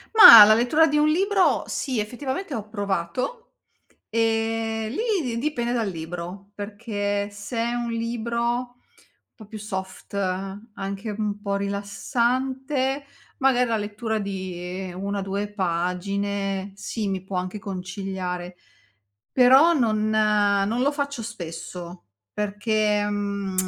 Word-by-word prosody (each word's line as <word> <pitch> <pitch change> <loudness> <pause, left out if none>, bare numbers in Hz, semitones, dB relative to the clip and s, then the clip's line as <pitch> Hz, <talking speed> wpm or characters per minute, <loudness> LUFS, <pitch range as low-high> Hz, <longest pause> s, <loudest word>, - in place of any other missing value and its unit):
Mah, 230 - +13
la 215 - +7
lettura 245 +8 +4
di 300 -2 0
un 300 0 +4
libro 385 +4 +3
sì, 255 -6 -2
effettivamente 265 - -4
ho 215 -3 -5
provato. 200 - -2 0.7
Ehm, 225 0 0
lì 425 - 0
di 235 -3 -2
dipende 245 -4 -1
dal 230 -4 0
libro, 175 +3 -7
perché 205 -1 -3
se 205 +4 -7
è 235 +1 0
un 240 -1 -2
libro 230 0 -2 0.2
un 245 0 -7 0.6
po' 215 - -13
più 215 +1 -8
soft, 190 -3 -6 0.6
anche 195 +2 -5
un 210 -1 -2
po' 200 -1 -1
rilassante, 255 +7 -1 0.3
magari 250 -2 +3
la 225 - +2
lettura 215 +2 -3
di 185 -2 -5
1,2 200 +1 -3
pagine 195 +2 -2
sì, 210 +1 -4
mi 190 -1 -3
può 190 -1 -5
anche 185 +3 -4
conciliare. 185 -2 -5 0.8
Però 265 +6 +7
non 215 -7 +1
non 210 +1 +2
lo 285 - +3
faccio 280 -3 -3
spesso, 175 -4 -8 0.3
perché, 210 0 0
mhmm, 200 -2 -2
210 Hz, 120 wpm, -24 LUFS, 195-240 Hz, 0.8 s, Mah